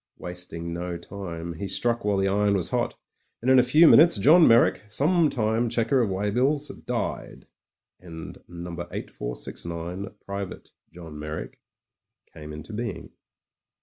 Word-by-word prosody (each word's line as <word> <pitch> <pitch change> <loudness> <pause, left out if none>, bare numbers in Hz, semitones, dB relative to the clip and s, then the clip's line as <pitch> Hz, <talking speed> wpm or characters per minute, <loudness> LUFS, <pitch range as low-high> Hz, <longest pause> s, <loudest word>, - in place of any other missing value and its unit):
Wasting 90 -1 -6
no 85 0 -4
time, 85 -2 -7
he 90 +5 -5
struck 115 +5 0
while 105 -1 +1
the 95 0 +1
iron 100 +1 +2
was 90 -4 0
hot, - - -1 0.4
and 130 +3 +1
in 130 - +7
a - - +6
few 155 +7 +6
minutes 165 -5 +7
Johii 155 - +6
Meyrick, 115 +1 +5
sometime 125 -7 +2
checker 120 +3 +2
of 115 - +1
weigh 100 +2 -1
bills, 140 +6 +1 0.2
died, - - -4 0.5
and 80 -3 -9
No. 85 0 -8
8469, 85 +2 -6 0.2
Private 100 -1 -6 0.2
John 80 -3 -10
Meyrick, 75 +1 -6 0.7
came 75 0 -9
into 75 +8 -9
being. 115 -2 -5
100 Hz, 140 wpm, -25 LUFS, 85-120 Hz, 0.7 s, in